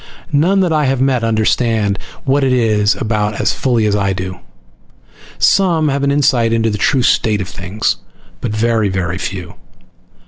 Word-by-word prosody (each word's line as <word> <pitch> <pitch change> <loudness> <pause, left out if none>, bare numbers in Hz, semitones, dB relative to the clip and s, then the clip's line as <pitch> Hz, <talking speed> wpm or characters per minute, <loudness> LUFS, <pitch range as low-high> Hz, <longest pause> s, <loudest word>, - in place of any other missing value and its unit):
None 180 +7 +3
that 175 -3 +1
I 150 -1 +2
have 135 -1 0
met 130 -3 +1
understand 110 -2 +1 0.2
what 140 +1 +1
it 130 - +2
is 110 -4 +2
about 105 -2 -2
as - - +1
fully 120 -4 0
as 105 -1 +1
I 100 -1 0
do. 95 -1 -6 1.0
Some 170 -6 +2
have 140 0 -1
an 140 - +1
insight 140 -5 +2
into 115 -1 +1
the 105 - -4
true 130 +3 +2
state 110 -3 +2
of 95 - -4
things, 95 +3 -2 0.4
but 120 - -3
very 110 -1 +1
very 90 -1 -2
few. 90 -4 -5
115 Hz, 170 wpm, -16 LUFS, 105-135 Hz, 1.0 s, None